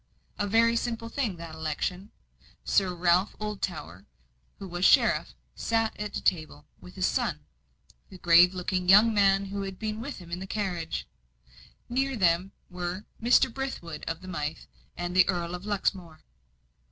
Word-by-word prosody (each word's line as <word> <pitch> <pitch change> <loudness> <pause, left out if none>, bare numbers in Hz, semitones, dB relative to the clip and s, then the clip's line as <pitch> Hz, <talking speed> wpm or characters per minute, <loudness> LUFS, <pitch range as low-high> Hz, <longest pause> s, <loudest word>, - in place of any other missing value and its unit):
A 205 - 0
very 230 +3 +4
simple 230 -1 -2
thing, 230 -6 -2
that 165 -1 -9
election! 160 +5 -3 0.5
Sir 190 -2 +2
Ralph 175 +3 +2
Oldtower, 175 - -5 0.5
who 195 - -8
was 175 0 -4
sheriff, - - +4 0.2
sat 225 -1 0
at 210 -1 -4
a - - -7
table, 155 -4 -1
with 180 - -14
his 185 -1 0
son, - - -1 0.7
the 190 - -11
grave 175 +1 +6
looking 180 0 -2
young 215 +4 +7
man 195 -1 +3
who 200 +1 -4
had 195 -1 -5
been 215 0 -4
with 280 +4 -6
him 175 -2 -12
in 175 - -3
the 190 - -7
carriage; 185 -6 -3 0.8
near 270 +2 0
them 180 -2 +2 0.2
were 180 +2 -5 0.2
Mr. 240 +1 +4
Brithwood 225 - -5
of 165 +1 -3
the 185 - -11
Mythe, 155 -4 -4 0.3
and 175 0 -4
the 185 - +5
Earl 175 -2 -1
of 180 +3 -7
Luxmore. 190 -5 -2
185 Hz, 160 wpm, -28 LUFS, 175-210 Hz, 0.8 s, young